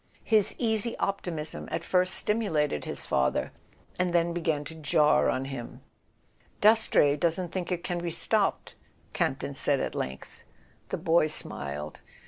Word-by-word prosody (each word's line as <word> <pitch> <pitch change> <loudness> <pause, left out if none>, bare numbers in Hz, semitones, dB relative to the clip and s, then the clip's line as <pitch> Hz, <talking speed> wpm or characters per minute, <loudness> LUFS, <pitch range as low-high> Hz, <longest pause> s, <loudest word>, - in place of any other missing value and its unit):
His 215 -3 +2
easy 225 -1 0
op¬ 195 0 -1
timism 160 -3 -5
at - - -2
first 185 0 +3
stimulated 160 - 0
his - - -4
father, 65 0 0 0.5
and 180 -1 0
then 170 0 +2
began 160 -4 -1
to 160 - -7
jar 155 -1 +3
on 130 +1 -1
him. 135 -3 -7 0.8
"Dastrey 210 -9 +5
doesn't 170 +3 0
think 185 -1 -4
it 175 -1 -2
can 175 -1 -2
be 170 - -2
stopped," 160 - +1 0.4
Camp - - 0
ton - - -4
said - - +2
at - - -3
length. 65 0 -6 0.5
The - - -2
boy 165 -1 +3
smiled. 75 - -3
170 Hz, 150 wpm, -28 LUFS, 150-185 Hz, 0.8 s, Dastrey